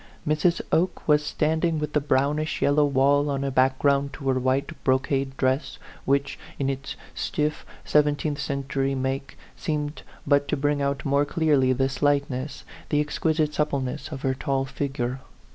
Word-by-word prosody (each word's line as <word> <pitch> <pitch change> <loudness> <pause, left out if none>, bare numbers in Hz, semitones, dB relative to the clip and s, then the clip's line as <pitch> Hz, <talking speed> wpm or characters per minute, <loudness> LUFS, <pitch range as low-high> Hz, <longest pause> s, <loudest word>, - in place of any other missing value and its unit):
Mrs. 155 +3 +2
Oke 175 +2 +1
was 150 -1 +4
standing 160 +2 0
with 150 -1 -3
the 150 - +2
brownish 145 +3 0
yellow 145 +1 +3
wall 145 +1 +3
as 140 0 -1
a 135 - -1
background 140 +2 +2
to 135 -3 -3
her 130 -1 +2
white 130 +2 0
brocade 135 +1 0
dress, 130 +3 0 0.3
which, 140 +1 0 0.2
in 135 -1 0
its 135 +1 -6 0.2
stiff, 150 0 -2 0.2
seventeenth 150 0 +2
century 135 0 -1
make, 135 +1 -3 0.2
seemed 150 -1 -3 0.2
but 145 0 +3
to - - 0
bring 145 +1 +1
out 140 -1 -1
more 140 +1 +3
clearly 145 -4 +2
the 135 +1 +2
slightness, 140 -1 -1 0.3
the 150 - +2
exquisite 150 +1 0
supple 150 -2 0
ness, 130 +4 -5
of 135 -3 -6
her 130 - +2
tall 135 +1 -1
figure. 135 -2 -3
140 Hz, 160 wpm, -25 LUFS, 135-150 Hz, 0.3 s, was